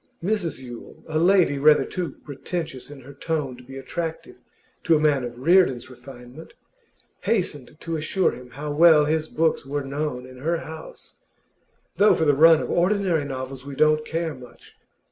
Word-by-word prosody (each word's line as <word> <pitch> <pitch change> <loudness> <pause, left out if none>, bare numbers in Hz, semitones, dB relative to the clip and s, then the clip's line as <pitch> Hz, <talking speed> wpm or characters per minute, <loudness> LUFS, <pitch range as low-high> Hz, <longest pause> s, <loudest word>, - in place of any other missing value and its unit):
Mrs 190 -4 -1
Yule, 120 -2 -11
a 155 0 -1
lady 175 -5 +3
rather 150 +1 +5
too 180 -3 -5
pretentious 145 -1 -6
in 145 -2 -11
her 135 +3 -12
tone 145 -3 -3
to 125 - -15
be 135 +2 -10
attractive 165 - -6 0.5
to 165 - +4
a - - +2
man 150 -4 +2
of 120 0 -6
Reardon's 135 -4 +2
refinement, 125 +3 -13 0.6
hastened 155 - -2
to 165 -1 -4
assure 170 +5 0
him 125 0 -11
how 145 +4 -6
well 155 -1 +6
his 155 +1 0
books 160 +1 0
were 145 +1 -3
known 135 -2 -4
in 130 0 -13
her 165 +5 0
house, 160 -1 -10 0.8
'though 205 +3 +5
for 160 - 0
the 145 - +4
run 160 +2 +6
of - - -4
ordinary 180 -4 +1
novels 130 -1 -6
we 140 0 -8
don't 155 +1 +3
care 165 0 -3
much. 125 -3 -15
150 Hz, 170 wpm, -23 LUFS, 135-165 Hz, 0.8 s, well